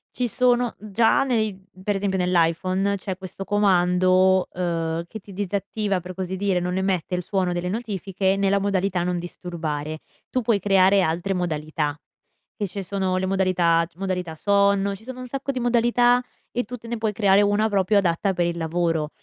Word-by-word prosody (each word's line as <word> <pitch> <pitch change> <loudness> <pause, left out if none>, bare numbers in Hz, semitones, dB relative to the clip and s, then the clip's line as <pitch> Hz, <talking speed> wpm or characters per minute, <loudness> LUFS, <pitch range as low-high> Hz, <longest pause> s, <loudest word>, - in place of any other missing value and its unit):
ci 250 - 0
sono 245 0 +2
già 215 +4 +2
nei 220 -7 0 0.2
per 205 +1 0
esempio 195 -1 -1
nell'iPhone 185 +3 +1
c'è 190 -1 -5
questo 190 0 -8
comando, 185 -2 +3
uhm, 165 -2 -2
che 220 - -8
ti 200 - -14
disattiva, 200 +1 -2
per 185 +1 -8
così 190 0 -3
dire, 190 -1 0
non 180 +1 -2
emette 190 -2 -1
il 180 - -2
suono 185 -1 0
delle 175 +1 -2
notifiche 195 -3 -1
nella 200 0 +2
modalità 195 -2 0
non 180 0 -1
disturbare. 160 -3 -5 0.3
Tu 255 - 0
puoi 220 -2 +2
creare 195 0 +4
altre 175 +3 0
modalità: 155 -4 -2 0.6
che 205 - -2
ci 195 +2 -6
sono 190 0 -1
le 185 - 0
modalità 185 -3 +2
c - - -35
modalità 180 -3 -3
sonno, 200 +2 +2
ci 200 - -16
sono 255 +1 -8
un - - -6
sacco 275 +2 -5
di 260 - -4
modalità 240 +1 +3 0.3
e 245 - -1
tu 250 +3 -7
te 230 - -13
ne 235 0 -3
puoi 220 -1 0
creare 200 -1 +4
una 205 +1 +2
proprio 200 0 +2
adatta 190 +1 +1
per 175 -1 0
il 170 - -2
lavoro 165 -2 -1
190 Hz, 180 wpm, -23 LUFS, 180-205 Hz, 0.6 s, creare